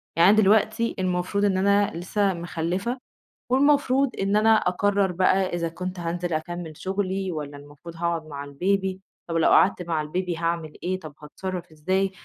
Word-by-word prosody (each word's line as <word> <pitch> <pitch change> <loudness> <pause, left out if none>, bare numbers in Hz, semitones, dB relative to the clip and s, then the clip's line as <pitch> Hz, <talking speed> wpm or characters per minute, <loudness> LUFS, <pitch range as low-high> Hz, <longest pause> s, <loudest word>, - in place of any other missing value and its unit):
يعني 170 +2 +6
أنا 215 - +5
دلوقتي 220 +3 +3
المفروض 185 +2 0
إن 195 -2 +2
أنا 200 +1 +3
لسه 190 +3 0
مخلفة، 175 +7 -3 0.5
والمفروض 275 -1 +3
إن 195 +1 +1
أنا 215 +1 +4
أقرر 195 0 +1
بقى 185 +2 +2
إذا 170 -1 -1
كنت 180 +2 -6
هانزل 175 0 -3
أكمّل 170 +1 -4
شُغلي 190 -1 -2
والّا 145 -2 -6
المفروض 145 +4 -12
هاقعد 170 -1 -2
مع 140 -1 -6
البيبي، 190 +6 -1 0.3
طب 165 - -2
لو 165 - +4
قعدت 190 -1 +4
مع 165 -3 -1
البيبي 175 +2 -3
هاعمل 165 -2 -2
إيه 185 +1 -1
طب 155 -4 -10
هاتصرف 180 +3 -6
إزاي، 190 +5 0
180 Hz, 160 wpm, -25 LUFS, 165-195 Hz, 0.5 s, يعني